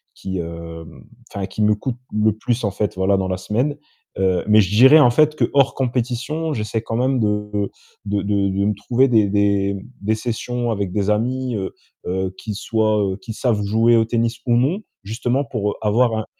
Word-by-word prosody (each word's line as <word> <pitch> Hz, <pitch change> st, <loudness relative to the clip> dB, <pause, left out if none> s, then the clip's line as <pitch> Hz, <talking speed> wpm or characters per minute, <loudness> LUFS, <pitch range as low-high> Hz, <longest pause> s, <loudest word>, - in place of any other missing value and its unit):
qui, 95 Hz, -1 st, -5 dB
hem, 85 Hz, -1 st, -8 dB, 0.3 s
enfin 100 Hz, -1 st, -3 dB
qui 100 Hz, +2 st, -5 dB
me 105 Hz, 0 st, +4 dB
coûte 120 Hz, +3 st, -4 dB, 0.2 s
le 105 Hz, 0 st, +3 dB
plus 120 Hz, +2 st, -1 dB
en 100 Hz, -, 0 dB
fait, 105 Hz, 0 st, -2 dB
voilà 95 Hz, +1 st, +2 dB
dans 95 Hz, -, -1 dB
la 95 Hz, -, 0 dB
semaine. 120 Hz, +10 st, -1 dB, 0.4 s
Heu, 95 Hz, -2 st, +1 dB
mais 105 Hz, 0 st, +6 dB
je 95 Hz, +1 st, -1 dB
dirais 130 Hz, +7 st, +8 dB
en 125 Hz, -5 st, +6 dB
fait 155 Hz, +4 st, +3 dB
que -, -, +1 dB
hors 140 Hz, -1 st, +3 dB
compétition, 130 Hz, +5 st, -2 dB
j'essaie 110 Hz, -1 st, -2 dB
quand 115 Hz, -, -4 dB
même 130 Hz, +1 st, +1 dB
de 105 Hz, -1 st, -1 dB, 0.5 s
de 100 Hz, 0 st, -1 dB
de 100 Hz, -1 st, +1 dB
de 100 Hz, +1 st, 0 dB
me 105 Hz, -, +2 dB
trouver 120 Hz, +6 st, +2 dB
des 110 Hz, -4 st, +4 dB
des 100 Hz, -1 st, +2 dB
m 100 Hz, -1 st, -5 dB, 0.2 s
des 110 Hz, +2 st, +1 dB
sessions 120 Hz, +1 st, -3 dB
avec 100 Hz, -4 st, -2 dB
des 105 Hz, -1 st, 0 dB
amis, 125 Hz, +3 st, -1 dB
heu 95 Hz, -1 st, -4 dB, 0.3 s
heu, 95 Hz, +1 st, -2 dB
qui 110 Hz, -, -5 dB
soient, 110 Hz, 0 st, 0 dB
heu, 95 Hz, -, -7 dB
qui 115 Hz, -1 st, -8 dB
savent 115 Hz, -2 st, 0 dB
jouer 115 Hz, +3 st, +3 dB
au 115 Hz, -, +3 dB
tennis 115 Hz, +1 st, -1 dB
ou 120 Hz, -, +4 dB
non 145 Hz, -, +1 dB, 0.2 s
justement 120 Hz, +6 st, -1 dB
pour 105 Hz, -6 st, -2 dB
avoir 110 Hz, +2 st, +2 dB
un 110 Hz, -, -3 dB
110 Hz, 205 wpm, -20 LUFS, 100-125 Hz, 0.5 s, dirais